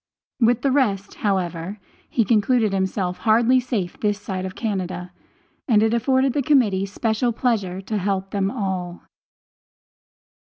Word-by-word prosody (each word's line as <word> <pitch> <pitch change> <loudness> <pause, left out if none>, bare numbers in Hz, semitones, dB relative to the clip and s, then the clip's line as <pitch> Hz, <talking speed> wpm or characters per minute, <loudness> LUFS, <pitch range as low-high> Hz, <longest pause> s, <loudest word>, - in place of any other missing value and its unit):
With 240 0 +3
the 275 - +2
rest, 210 -8 +1
however, 185 -1 -2 0.3
he 230 - +1
concluded 220 -1 +2
himself 190 -1 -1
hardly 235 +3 +4
safe 225 -8 -3
this 205 -1 0
side 190 -2 -4
of 185 - -9
Canada, 185 -5 -3 0.6
and 220 -4 +4
it 225 0 +2
afforded 260 +2 +2
the 290 - +1
Committee 225 -9 +2
special 220 +3 0
pleasure 205 -6 -1
to 210 +2 -3
help 195 0 -2
them 195 -1 0
all. 190 -6 -4
205 Hz, 135 wpm, -22 LUFS, 190-235 Hz, 0.6 s, hardly